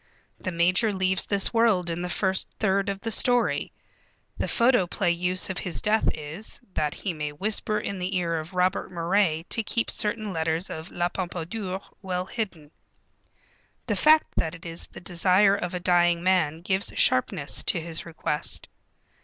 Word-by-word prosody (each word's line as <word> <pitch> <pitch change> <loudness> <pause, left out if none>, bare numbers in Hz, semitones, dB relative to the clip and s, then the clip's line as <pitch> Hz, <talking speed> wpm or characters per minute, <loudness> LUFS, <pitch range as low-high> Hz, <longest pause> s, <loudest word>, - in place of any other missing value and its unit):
The 185 - -3
major 180 +6 +3
leaves 190 -1 0
this 200 +2 +1
world 225 -6 +3
in 165 +1 -3
the 180 - -3
first 190 +1 0
third 200 0 +1
of 195 0 -4
the 225 - -3
story. 245 +2 +2 0.6
The - - -2
photoplay 230 -8 +2
use 180 +2 0
of 185 - -4
his 180 -3 +1
death 220 +1 +2
is, 155 +8 -7
that 150 -1 -1
he 190 - -3
may 150 -2 -4
whisper 210 +6 0
in 200 -2 -4
the 185 +2 -2
ear 170 -2 -1
of 155 +3 -8
Robert 185 +1 0
Moray 170 -1 +1
to 230 - +1
keep 230 +1 -1
certain 215 -2 -1
letters 160 +2 -1
of 160 +1 -6
La 175 0 -1
Pompadour 185 +2 -4 0.2
well 180 -2 -3
hidden. 190 -9 -5 1.1
The - - -1
fact 310 0 +5
that 160 +1 0
it 170 - -13
is 165 0 -3
the - - -12
desire 185 +3 +3
of 180 -2 -4
a - - -2
dying 175 -1 +3
man 165 -4 +2
gives 190 +1 0
sharpness 140 +2 +2
to 175 - +3
his 165 0 -5
request. 160 -2 -2
180 Hz, 170 wpm, -26 LUFS, 170-200 Hz, 1.1 s, fact